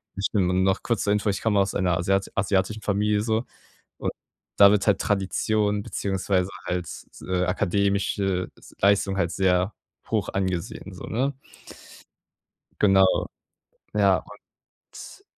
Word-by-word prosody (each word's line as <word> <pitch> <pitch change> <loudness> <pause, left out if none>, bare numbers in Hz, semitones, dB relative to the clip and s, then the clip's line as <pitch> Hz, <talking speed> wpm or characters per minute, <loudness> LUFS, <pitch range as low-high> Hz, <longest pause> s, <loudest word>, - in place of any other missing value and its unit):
ich 100 - -1
n 95 -3 +2
noch 95 0 +1
kurz 115 -5 0
zur 100 - +2
Info, 105 +1 -1
ich 100 - -2
komme 105 -3 +2
aus 95 - +1
einer 90 -3 +1
asiat 95 +2 0
asiatischen 100 +2 0
Familie 105 +1 +1
so. 110 +1 0 0.6
Und - - -2 0.5
da 100 0 +8
wird 105 -1 +2
halt 105 - +3
Tradition 105 +1 0
beziehungsweise 95 -1 -1 0.2
halt, 90 -1 -2 0.4
äh, 90 -1 +1
akademische 95 0 0
s - - -17
Leistung 100 0 +3
halt 85 -3 0
sehr 95 +1 +1 0.4
hoch - - 0
angesehen, 95 -3 -3
so, - - -10
ne? 130 +5 -1 1.5
Genau. 95 -2 +4 0.7
Ja, - - +4 0.6
und 395 - -13
100 Hz, 135 wpm, -25 LUFS, 95-105 Hz, 1.5 s, da